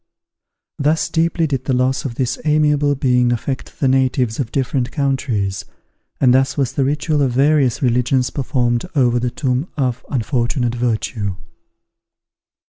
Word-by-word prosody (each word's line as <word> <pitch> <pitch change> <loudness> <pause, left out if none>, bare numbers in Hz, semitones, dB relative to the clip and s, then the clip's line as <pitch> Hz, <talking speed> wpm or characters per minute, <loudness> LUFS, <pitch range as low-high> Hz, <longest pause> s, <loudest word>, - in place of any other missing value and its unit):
Thus 150 +3 +1
deeply 165 0 +1
did 135 -4 -2
the 135 - 0
loss 130 +2 0
of 120 -4 -4
this 130 +1 -2
amiable 150 -1 +2
being 125 -2 +2
affect 130 +3 -4
the 135 - +2
natives 130 -3 +1
of 125 -4 -2
different 130 -2 -1
countries, 125 - -1 0.6
and 125 -2 +4
thus 135 +2 +2
was 130 -3 0
the 135 - +1
ritual 150 +2 0
of 130 -3 +1
various 140 -1 +2
religions 125 +1 +1
performed 125 -4 -1
over 120 -3 +3
the 125 +1 -1
tomb 130 +4 -1
of 125 -3 -1
unfortunate 120 -1 -1
virtue. 110 -4 -2
130 Hz, 140 wpm, -19 LUFS, 120-140 Hz, 0.6 s, and